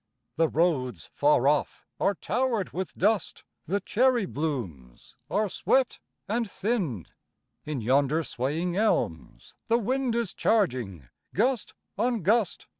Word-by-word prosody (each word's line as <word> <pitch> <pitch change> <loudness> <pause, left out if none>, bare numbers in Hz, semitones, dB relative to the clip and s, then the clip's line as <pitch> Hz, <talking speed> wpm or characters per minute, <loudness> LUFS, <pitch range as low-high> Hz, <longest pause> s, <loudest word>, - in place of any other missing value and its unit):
The 165 0 +3
roads 150 -7 0
far 145 -2 +3
off 145 0 0
are 200 - +2
towered 235 -3 -1
with 185 +1 -4
dust; 210 +2 +1 0.2
The 200 +4 +1
cherry 240 +2 +2
blooms 115 - -5 0.2
are 210 +6 +1
swept 260 +6 +1 0.3
and 225 +1 -1
thinned; 185 - -2 0.6
In 150 -5 -2
yonder 140 +7 +2
swaying 155 +7 -2
elms 190 - -1
the 230 - +4
wind 250 +1 0
Is 235 -5 -1
charging 120 - 0 0.3
gust 240 +2 0 0.2
on 235 -3 +1
gust. 210 +1 +1
185 Hz, 120 wpm, -27 LUFS, 140-225 Hz, 0.6 s, the